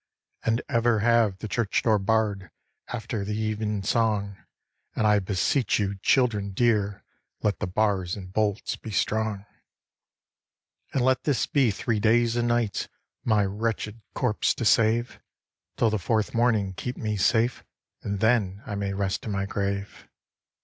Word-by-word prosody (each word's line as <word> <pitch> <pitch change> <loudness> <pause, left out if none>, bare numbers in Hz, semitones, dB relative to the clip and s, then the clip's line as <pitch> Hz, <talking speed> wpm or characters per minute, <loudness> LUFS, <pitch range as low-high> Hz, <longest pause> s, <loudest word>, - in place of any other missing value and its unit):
`And 115 +2 +1
ever 115 -4 +2
have 115 -4 +3
the 110 - -6
church 110 0 0
door 110 -3 +3
barr'd 100 -2 0 0.4
After 115 -3 -4
the 105 +1 -3
even 110 -2 -2
song; 105 -2 0 0.6
And 110 - +1
I 105 -1 +5
beseech 100 +6 +1
you, 100 -1 -2
children 105 -5 +2
dear, 105 -3 +1 0.4
Let 105 - +1
the - - -2
bars 95 -2 0
and 95 -2 -9
bolts 105 -1 0
be - - -10
strong. 110 -1 -1 1.5
'And 125 -2 +1
let 130 0 +2
this 145 -4 +1
be 135 -5 +2
three 110 +2 -1
days 115 +2 +3
and 120 0 +1
nights 120 -3 0 0.4
My 105 -3 +3
wretched 105 +2 -3
corpse 120 -5 +1
to 115 - -3
save; 115 +3 +2 0.6
Till 115 - +3
the 110 - 0
fourth 110 +4 0
morning 110 -5 +2
keep 125 +7 -5
me 105 -1 -2
safe, 115 +5 +2 0.4
And 100 -1 -3
then 110 -4 +2
I 105 - -5
may 100 -1 -2
rest 95 -1 -2
in - - -2
my 100 -1 -1
grave.' 100 0 -4
110 Hz, 150 wpm, -26 LUFS, 100-115 Hz, 1.5 s, I